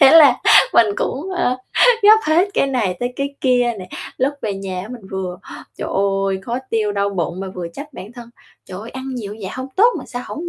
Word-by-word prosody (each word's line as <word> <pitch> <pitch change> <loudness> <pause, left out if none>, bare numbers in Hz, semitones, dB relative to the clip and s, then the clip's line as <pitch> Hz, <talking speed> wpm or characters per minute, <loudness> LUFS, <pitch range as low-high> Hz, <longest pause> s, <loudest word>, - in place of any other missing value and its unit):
thế 270 -2 +8
là 295 -6 +8 0.4
mình 230 - +6
cũng, 310 +9 -3
ơ, 300 -9 0 0.5
gắp 430 +2 +8
hết 335 +5 +3
cái - - +2
này 240 -9 0
tới 245 0 -2
cái 280 0 -3
kia 245 -2 +2
nè. 185 -1 -9 0.3
Lúc 270 +3 0
về 205 -2 -2
nhà 190 -2 -5
á 195 - -8
mình 235 -6 -10
vừa, 185 -2 -4 0.4
trời - - -4 0.4
ơi, 190 - -1
khó 240 +4 -3
tiêu, 215 -2 0
đau 200 0 0
bụng 180 -1 -3
mà 195 - -4
vừa 175 -2 -5
trách 285 - -10
bản 215 -1 -10
thân: 235 -1 -11 0.3
"Trời 185 0 -8
ơi, 225 - -9
ăn 265 0 -7
nhiều 210 -4 -6
vậy 190 - -5
hông 260 +1 -6
tốt 450 +5 +6
mà - - -8
sao 245 0 -6
hổng 340 +3 -6
240 Hz, 230 wpm, -19 LUFS, 195-275 Hz, 0.5 s, thế